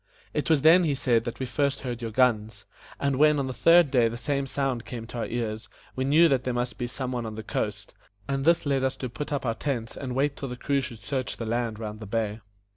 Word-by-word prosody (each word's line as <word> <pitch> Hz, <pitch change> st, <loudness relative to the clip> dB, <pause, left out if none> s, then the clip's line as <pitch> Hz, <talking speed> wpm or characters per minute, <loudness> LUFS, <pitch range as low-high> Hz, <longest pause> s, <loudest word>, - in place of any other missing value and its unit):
"It 150 Hz, -, -1 dB
was 155 Hz, -4 st, +3 dB
then," 170 Hz, +3 st, +7 dB
he 150 Hz, -4 st, +1 dB
said, 120 Hz, -4 st, +2 dB
"that 120 Hz, -, -5 dB
we 130 Hz, -, -1 dB
first 140 Hz, +2 st, 0 dB
heard 125 Hz, -2 st, -4 dB
your 115 Hz, -, -3 dB
guns; 110 Hz, -2 st, +1 dB, 0.3 s
and 140 Hz, -2 st, 0 dB
when 150 Hz, +1 st, +5 dB
on 140 Hz, -, 0 dB
the 130 Hz, -, -4 dB
third 165 Hz, 0 st, +5 dB
day 120 Hz, -4 st, +4 dB
the 115 Hz, +1 st, -4 dB
same 140 Hz, +2 st, -1 dB
sound 135 Hz, -4 st, -1 dB
came 115 Hz, -2 st, -7 dB
to 120 Hz, +1 st, -7 dB
our -, -, -1 dB
ears, 110 Hz, -2 st, -3 dB, 0.3 s
we 130 Hz, -, -1 dB
knew 155 Hz, +5 st, +6 dB
that 135 Hz, -4 st, +1 dB
there 125 Hz, -2 st, -2 dB
must 120 Hz, 0 st, -2 dB
be 120 Hz, -, -1 dB
some 130 Hz, +1 st, -4 dB
one 125 Hz, -2 st, -2 dB
on 110 Hz, -, -6 dB
the 110 Hz, -, -6 dB
coast, 105 Hz, -1 st, -3 dB, 0.3 s
and 135 Hz, 0 st, -1 dB
this 170 Hz, +2 st, +3 dB
led 135 Hz, -2 st, +1 dB
us 130 Hz, 0 st, 0 dB
to 130 Hz, -, -4 dB
put 150 Hz, +5 st, -6 dB
up 140 Hz, -2 st, -1 dB
our 115 Hz, -, +1 dB
tents 120 Hz, -3 st, -3 dB
and 130 Hz, -3 st, -5 dB
wait 140 Hz, +1 st, +1 dB
till 135 Hz, -, -5 dB
the 125 Hz, -, -6 dB
crew 140 Hz, +2 st, 0 dB
should 120 Hz, -5 st, -8 dB
search 130 Hz, +6 st, -3 dB
the 115 Hz, -, -4 dB
land 115 Hz, -1 st, -1 dB
round 105 Hz, -1 st, -6 dB
the 110 Hz, -, -8 dB
bay." 110 Hz, 0 st, -1 dB
125 Hz, 265 wpm, -27 LUFS, 115-140 Hz, 0.3 s, then